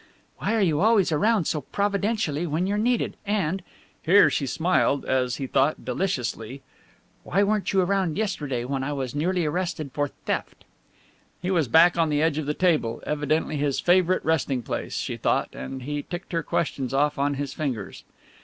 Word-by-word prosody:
"Why 225 - 0
are 220 - +2
you 160 -5 +2
always 210 -4 +4
around 205 +4 +2
so 150 - -1
providentially 200 - -1
when 160 +4 0
you're 205 +2 0
needed, 240 +1 0
and," 195 -3 -1 0.4
here 200 +5 +6
she 140 - -1
smiled 160 -2 +1
(as 125 -2 0
he 135 - -4
thought) 135 +1 +1
deliciously, 130 - -3 0.6
"why 200 - +1
weren't 210 0 0
you 190 -1 +3
round 185 -4 0
yesterday, 145 - -2
when 135 +1 -2
I 145 +2 -2
was 130 -3 -3
nearly 175 +4 0
arrested 170 -2 -2
for 145 -1 0
theft?" - - -5 0.8
He 180 +1 -2
was 165 -7 +2
back 170 +6 +5
on 165 -1 +3
the 150 0 +1
edge 160 -2 +1
of 150 - -4
the 150 - -1
table, 155 -11 +1
evidently 150 +1 0
his 140 -1 0
favourite 185 +1 +3
resting 140 -5 0
place, - - -4
she - - -3
thought, - - +1
and 130 -1 -7
he 145 +2 -3
ticked 175 +6 -7
her 165 -2 0
questions 135 -5 -2
off 145 +1 +1
on 140 0 +1
his 140 -1 -4
fingers. 125 - -4
155 Hz, 180 wpm, -25 LUFS, 140-185 Hz, 0.8 s, here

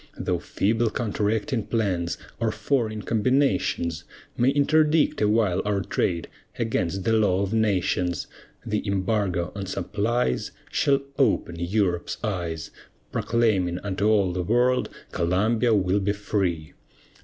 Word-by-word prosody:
Though 90 -2 -1
feeble 110 +6 0
counteracting 110 +2 -1
plans, 95 -7 -1 0.2
or 115 -1 +1
foreign 110 -1 -1
combinations, 115 - +1 0.3
May 125 +2 +3
interdict 150 +1 +3
awhile 105 -3 +2
our 100 -1 0
trade, 85 -3 -1 0.3
against 95 -5 -1
the 115 - +2
law 100 -3 +3
of 100 +2 -3
nations, 90 -6 +1 0.4
The 105 -2 -1
embargo 95 -3 0
on 100 -1 -5
supplies 105 - -1 0.2
Shall 140 -1 +2 0.2
open 85 -10 +1
Europe's 90 -1 0
eyes; 85 -7 -3 0.4
Proclaiming 105 -7 +1
unto 100 +1 0
all 100 -4 +3
the 90 - -1
world, 120 +6 +2 0.2
"Columbia 110 +7 +2
will 95 0 +2
be 100 +1 0
free." 95 -6 -2
105 Hz, 120 wpm, -25 LUFS, 90-115 Hz, 0.4 s, May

